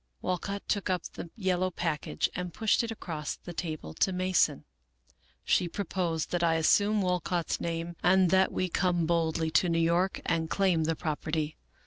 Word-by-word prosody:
Walcott 200 +2 -3
took 205 -2 -1
up 180 -2 0
the 170 - -7
yellow 185 -3 0
package, 165 -4 -1
and 180 -1 -4
pushed 220 +5 +2
it 230 - -3
across 165 -9 -4
the 175 - -10
table 155 - -5
to 190 - +1
Mason. 185 0 +1 0.4
" - - -32 0.3
She 180 - +3
proposed 170 -3 -2
that 175 - 0
I 165 -1 +3
assume 205 +6 +3
Walcott's 180 -2 -1
name, 170 0 -3
and 185 -1 +4
that 190 0 +4
w^e 185 -2 -2
come 175 -3 +2
boldly 160 -1 0
to 180 - +3
New 165 - +1
York 170 +3 +2
and 165 -1 0
claim 180 -5 +2
the 165 +1 0
property. 155 -1 -2
175 Hz, 170 wpm, -29 LUFS, 165-185 Hz, 0.4 s, and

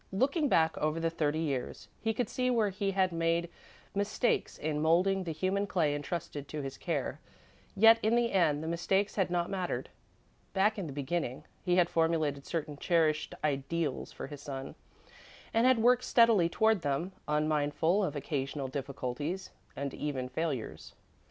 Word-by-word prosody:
Looking 275 - +1
back 160 -1 +3
over 155 +2 0
the 165 0 0
thirty 155 -2 0
years, 140 -6 -3
he 225 - +1
could 230 +1 -1
see 255 +3 -1
where 225 -4 +2
he 195 +1 -1
had 190 -1 +2
made 165 0 0 0.4
mistakes 205 +4 0
in 150 -1 -2
moulding 185 +4 +3
the 165 - -2
human 190 +5 0
clay 160 -7 +1
entrusted 145 -1 -4
to 150 0 -5
his 135 0 -5
care, 150 -5 -3 0.6
yet, 225 +2 +7
in 220 +2 +2
the 240 -1 +2
end, 160 -5 +2
the - - -4
mistakes 190 +4 0
had 190 -3 +1
not 175 +1 -1
mattered. 185 -2 -2 0.6
Back 210 +2 +2
in 185 - -3
the - - -6
beginning, 140 -1 -3 0.2
he 180 - +1
had 180 -1 +4
formulated 160 -4 0
certain 155 -3 -3
cherished 155 -2 +1
ideals 145 0 -1
for - - -7
his 145 +1 -9
son, 135 -1 -6 0.8
and 230 +3 +4
had 255 -1 +5
worked 245 +2 +4
steadily 225 -8 +5
toward 220 +1 +2
them, 145 +6 -1 0.2
unmindful 150 +5 +1
of 185 - -2
occasional 140 -1 -3
difficulties 140 +5 -4 0.2
and 140 -1 -4
even 130 -4 -3
failures. 140 -3 -4
165 Hz, 165 wpm, -31 LUFS, 145-195 Hz, 0.8 s, yet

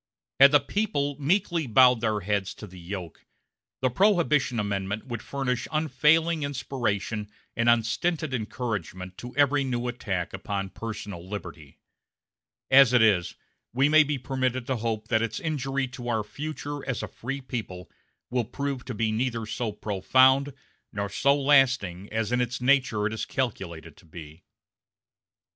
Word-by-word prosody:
Had 140 +1 +9
the 145 - +6
people 145 -3 -1
meekly 170 0 +1
bowed 125 +1 +5
their 110 -2 0
heads 100 0 -1
to - - -9
the 95 -2 -12
yoke, 90 -1 -7 0.6
the 130 - +2
Prohibition 150 - +2
Amendment 100 0 -2
would 120 -4 -5
furnish 125 -3 -2
unfailing 160 +1 +2
inspiration 115 -7 -2 0.3
and 115 0 +2
unstinted 135 +7 +1
encouragement 105 -6 -4
to 125 +1 -9
every 145 0 +3
new 125 -2 -2
attack 95 -8 -3
upon 100 0 -4
personal 105 -5 -7
liberty; 85 -8 -8 0.9
as 135 -2 +7
it 125 -2 +6
is, 100 -6 +2 0.4
we 135 +4 +3
may 155 +1 +7
be 150 -1 0
permitted 130 -1 -2
to 130 0 -1
hope 110 -1 -3
that 110 -2 +2
its 115 -1 -2
injury 140 -3 -2
to 125 -1 -8
our 110 -2 0
future 145 +3 -6
as 130 - -2
a - - -3
free 135 +4 -5
people 110 -9 -6 0.4
will 125 -1 +1
prove 135 +2 -4
to 125 - -5
be 110 0 0
neither 115 0 -1
so 110 +1 -3
profound 130 +8 +3 0.4
nor 100 0 -3
so 140 +8 +2
lasting 125 -10 +2
as 110 0 -1
in 125 0 +2
its 120 0 -2
nature 125 -5 +2
it 110 - -1
is 110 - -3
calculated 85 - -4
to - - -20
be. 80 0 -11
120 Hz, 155 wpm, -26 LUFS, 105-140 Hz, 0.9 s, Had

